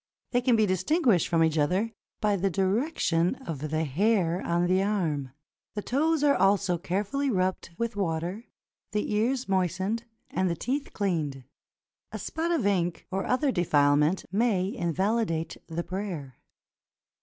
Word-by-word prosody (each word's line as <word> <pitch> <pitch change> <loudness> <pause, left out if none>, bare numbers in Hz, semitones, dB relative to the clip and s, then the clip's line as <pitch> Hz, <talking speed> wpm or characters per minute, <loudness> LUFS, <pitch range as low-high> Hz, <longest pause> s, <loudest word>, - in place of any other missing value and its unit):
They 245 - +2
can 250 -1 +3
be 220 -1 +4
distinguished 195 - +2
from 165 -1 +3
each 160 -1 +2
other 185 +10 +1 0.3
by 210 -1 +2
the 195 +1 +1
direction 190 - +1
of 155 - -5
the 155 +1 0
hair 175 - +1
on 170 +1 +1
the 185 +2 +3
arm. 165 -10 0 0.5
The 210 - -3
toes 305 +3 +1
are 285 -1 +5
also 195 -3 +2
carefully 210 - -1
rubbed 185 -5 -1
with 235 -2 -2
water, 180 +3 -2 0.5
the 210 0 -1
ears 245 +5 +1
moistened, 190 +4 0 0.3
and 185 -1 +1
the 170 - 0
teeth 275 - -3
cleaned. 155 -9 -1 0.7
A - - -4
spot 325 +1 -3
of 330 -11 +1
ink, 175 -4 0
or 190 +1 -2
other 270 +2 +2
defilement, 150 - +3
may 200 -2 +1
invalidate 170 -1 -1
the 165 +1 -3
prayer. 175 - -5
190 Hz, 145 wpm, -28 LUFS, 170-225 Hz, 0.7 s, are